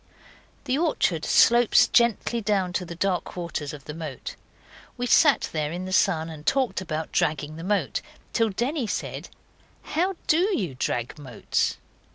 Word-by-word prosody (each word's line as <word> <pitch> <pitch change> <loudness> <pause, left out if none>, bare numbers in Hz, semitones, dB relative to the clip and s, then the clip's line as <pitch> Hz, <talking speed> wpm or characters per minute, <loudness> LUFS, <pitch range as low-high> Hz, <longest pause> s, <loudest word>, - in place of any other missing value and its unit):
The 265 +1 0
orchard 190 - +1
slopes 240 -1 +5
gently 235 0 +2
down 195 -4 0
to 180 - -2
the 170 - -8
dark 180 0 -1
waters 165 -4 -4
of 145 -3 -10
the 150 - -6
moat. 155 -4 -7 0.6
We 245 - -2
sat 290 +3 +4
there 155 -1 -1
in 180 +2 -4
the 185 - -5
sun 175 -5 +2
and 155 -2 -9
talked 250 - +1
about 160 -3 -4
dragging 150 0 0
the 165 - -8
moat, 210 - 0 0.3
till 225 -1 +2
Denny 245 +6 -2
said, - - -4 0.5
'How 370 +4 -1
DO 365 +6 +2
you 175 -9 -3
drag 125 +2 -3
moats? 130 -5 -1
185 Hz, 160 wpm, -25 LUFS, 155-240 Hz, 0.6 s, slopes